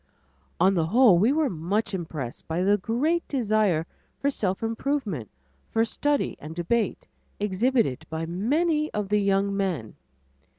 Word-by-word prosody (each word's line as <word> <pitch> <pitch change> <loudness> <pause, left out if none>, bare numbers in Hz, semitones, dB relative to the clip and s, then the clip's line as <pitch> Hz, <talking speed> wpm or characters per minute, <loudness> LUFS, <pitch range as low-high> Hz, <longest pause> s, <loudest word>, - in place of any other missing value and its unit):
On 190 +3 +5
the 165 -4 +1
whole 220 -2 +6
we 220 +7 +4
were 305 0 +2
much 200 +3 -2
impressed 155 -9 -5
by 165 +3 -1
the 205 +2 +4
great 270 - 0
desire 215 - +1 0.3
for 280 - +1
self 195 -5 -2
improvement, 225 - -2 0.4
for 225 0 +2
study 290 +5 0
and 155 +2 -8
debate, 195 +5 -1 0.3
exhibited 210 - 0
by 160 0 -3
many 300 - 0
of 210 -2 -2
the 210 0 +3
young 200 0 +1
men. 180 - -2
205 Hz, 140 wpm, -26 LUFS, 175-240 Hz, 0.4 s, whole